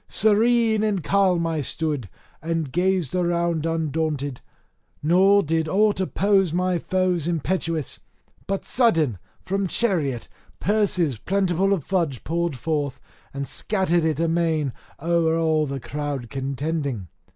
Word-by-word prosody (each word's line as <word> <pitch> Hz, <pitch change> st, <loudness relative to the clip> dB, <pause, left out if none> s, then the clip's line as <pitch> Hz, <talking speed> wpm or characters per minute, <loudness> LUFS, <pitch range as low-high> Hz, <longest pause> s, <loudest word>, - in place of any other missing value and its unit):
Serene 220 Hz, +1 st, +3 dB
and 205 Hz, -5 st, 0 dB
calm 185 Hz, -2 st, +2 dB
I 160 Hz, -2 st, -1 dB
stood, 145 Hz, -6 st, -3 dB, 0.3 s
and 165 Hz, -3 st, -2 dB
gazed 180 Hz, -3 st, 0 dB
around 170 Hz, -2 st, 0 dB
undaunted; 155 Hz, -4 st, -2 dB, 0.6 s
nor 190 Hz, +5 st, +5 dB
did 160 Hz, +1 st, 0 dB
aught 205 Hz, +4 st, +2 dB
oppose 195 Hz, +1 st, +2 dB
against 160 Hz, -, -6 dB
my 180 Hz, -1 st, +1 dB
foes 180 Hz, -2 st, 0 dB
impetuous. 165 Hz, -2 st, -2 dB, 0.5 s
But 195 Hz, 0 st, -2 dB
sudden 165 Hz, -, +2 dB, 0.2 s
from 195 Hz, 0 st, -1 dB
chariot 160 Hz, -, 0 dB, 0.3 s
purses 185 Hz, -, +1 dB
plentiful 195 Hz, -, +1 dB
of 190 Hz, -7 st, +1 dB
fudge 165 Hz, -9 st, -1 dB
poured 170 Hz, -2 st, -1 dB
forth, 145 Hz, 0 st, -2 dB, 0.3 s
and 140 Hz, 0 st, -4 dB
scattered 185 Hz, -5 st, +1 dB
it 160 Hz, -2 st, 0 dB
amain 165 Hz, -4 st, +1 dB, 0.3 s
o'er 165 Hz, 0 st, +1 dB
all 160 Hz, -2 st, +2 dB
the 135 Hz, 0 st, -4 dB
crowd 140 Hz, -2 st, -4 dB
contending. 140 Hz, -, -3 dB
165 Hz, 125 wpm, -23 LUFS, 150-190 Hz, 0.6 s, nor